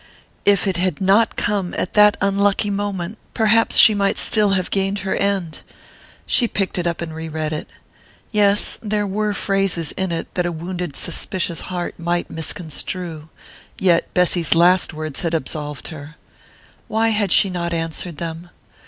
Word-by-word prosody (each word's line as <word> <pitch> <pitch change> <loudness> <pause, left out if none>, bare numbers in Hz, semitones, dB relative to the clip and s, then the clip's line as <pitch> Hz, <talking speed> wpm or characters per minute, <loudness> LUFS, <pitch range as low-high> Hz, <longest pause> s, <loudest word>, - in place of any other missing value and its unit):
If 200 0 +4
it 190 -3 0
had 180 -3 0
not 200 +4 +3
come 200 -4 -1
at 185 - -2
that 210 0 +6
unlucky 200 +1 +1
moment 200 0 -3 0.2
perhaps 225 +1 +3
she 220 - +9
might 200 -1 +1
still 210 -3 +3
have 185 -2 -1
gained 195 0 0
her 190 - 0
end.... 195 -5 -1 0.6
She 240 - +3
picked 195 -4 -2
it 175 - -1
up 170 -1 -2
and 165 -2 -5
re 160 0 -6
read 155 0 -3
it. 155 - -5 0.6
Yes 205 -1 +2
there 210 -1 -1
were 210 +1 -1
phrases 195 -5 0
in 190 -2 -3
it 165 - -4
that 180 -1 0
a - - -2
wounded 175 -1 -5
suspicious 175 -3 -2
heart 180 -1 -4
might 170 +1 -2
misconstrue.... 160 0 -4 0.5
Yet 175 -3 +2
Bessy's 175 -3 +3
last 180 +2 +4
words 155 -3 -4
had 165 -1 -1
absolved 150 -1 -5
her.... 155 -1 -10 0.7
Why 225 +1 +1
had 210 -4 0
she 195 +1 +5
not 170 -1 -3
answered 165 0 -3
them? 165 +1 -6
180 Hz, 160 wpm, -20 LUFS, 165-200 Hz, 0.7 s, she